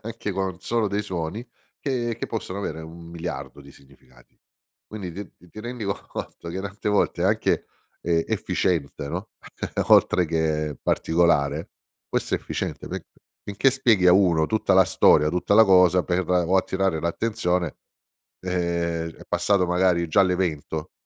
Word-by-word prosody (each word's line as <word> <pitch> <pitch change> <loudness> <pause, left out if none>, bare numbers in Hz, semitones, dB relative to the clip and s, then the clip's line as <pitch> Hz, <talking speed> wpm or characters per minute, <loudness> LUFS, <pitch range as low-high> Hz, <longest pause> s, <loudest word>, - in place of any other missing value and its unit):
anche 110 -2 -5
con 95 0 -1
un 90 - -21
solo 115 -1 0
dei 100 +1 -1
suoni, 95 +5 -5 0.3
che 120 -5 -2
che - - -3
possono 100 -3 -5
avere 80 -5 -4
un 85 +1 -11
miliardo 70 -5 -6
di 70 - -14
significati. 65 -3 -22 0.5
Quindi 95 -5 -7
ti 95 -2 -11
ti 110 - -9
rendi 120 -1 -6
co 100 0 0
conto 85 - -7
che 90 +3 -4
tante 100 +1 -5
volte, 105 -1 +1
ehm, - - +4
anche - - +1 0.4
efficiente, 80 -2 -1
no, - - -5 0.6
oltre 90 - +5
che 75 -2 -1
particolare 80 -2 +1 0.4
questo - - -1
è - - 0
efficiente, - - -5
perché - - -5 0.4
finché 105 +7 +2
spieghi 115 -8 +3
a 90 - +8
uno 90 -5 +4
tutta 110 +4 +1
la 95 0 +7
storia, 75 -4 +4
tutta 90 +3 -1
la 110 +1 +8
cosa, 90 -2 +5
per 90 -1 -1
o 90 0 +2
attirare 95 -3 0
l'attenzione, 90 -2 -1 0.7
ehm, 85 -2 -1
è - - -13
passato 100 -3 +2
magari 90 -1 +2
già 80 +5 +4
l'evento, 85 -4 -1
90 Hz, 155 wpm, -24 LUFS, 80-100 Hz, 0.7 s, a